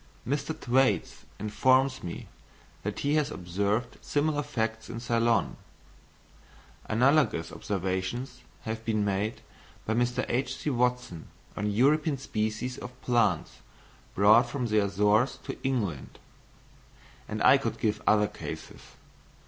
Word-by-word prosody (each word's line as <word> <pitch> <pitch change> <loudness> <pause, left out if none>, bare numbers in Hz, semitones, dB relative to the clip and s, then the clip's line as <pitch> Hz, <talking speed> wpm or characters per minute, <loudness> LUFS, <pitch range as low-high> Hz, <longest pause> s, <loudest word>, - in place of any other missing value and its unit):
Mr. 145 +4 -2
Thwaites 125 -7 +1
informs 130 +5 +2
me 85 - -6 0.5
that - - -4
he 145 +1 +1
has 150 -2 +2
observed 100 +7 -2
similar 145 0 0
facts 110 -6 -3
in 115 - -5
Ceylon; 115 -1 +1 1.3
analogous 130 - +2
observations 95 +7 -3 0.2
have 110 0 -5
been 110 -2 0
made 100 +3 -1 0.4
by 110 - 0
Mr. 120 +1 0
H.C. 130 +4 -1
Watson 125 - -1 0.3
on 105 +1 -1
European 145 +7 +2
species 110 0 -3
of 125 +1 -9
plants 115 -8 +1 0.6
brought 110 +5 +6
from 125 0 -2
the 110 -2 +2
Azores 105 +6 +2
to - - -5
England; 105 - -2 1.1
and - - -3
I - - +7
could - - -3
give 105 -1 0
other 105 -1 +5
cases. - - -8
115 Hz, 115 wpm, -28 LUFS, 105-130 Hz, 1.3 s, I